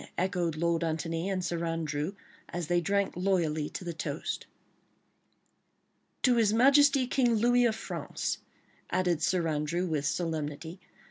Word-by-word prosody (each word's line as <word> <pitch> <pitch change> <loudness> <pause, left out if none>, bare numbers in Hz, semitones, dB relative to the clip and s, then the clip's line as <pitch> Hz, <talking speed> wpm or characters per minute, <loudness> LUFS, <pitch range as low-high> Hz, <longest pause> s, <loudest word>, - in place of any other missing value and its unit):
echoed 175 -3 0
Lord 170 +1 +1
Antony 165 +2 -2
and 185 -2 -1
Sir 170 -1 -2
Andrew 165 +1 -2 0.3
as 175 -1 -3
they 175 +2 +2
drank 200 +3 0
loyally 170 -5 0
to - - -6
the 170 -1 -4
toast. 150 0 -4 1.8
"To 250 -3 +4
His 220 -3 +4
Majesty 275 +3 +5
King 245 -2 +2
Louis 245 +2 +4
of 225 -2 +2
France," - - -4 0.5
added 175 -4 +1
Sir 170 0 +1
Andrew, 155 +3 -1
with 150 -4 -1
solemnity. 160 +1 -3
175 Hz, 135 wpm, -30 LUFS, 160-200 Hz, 1.8 s, Majesty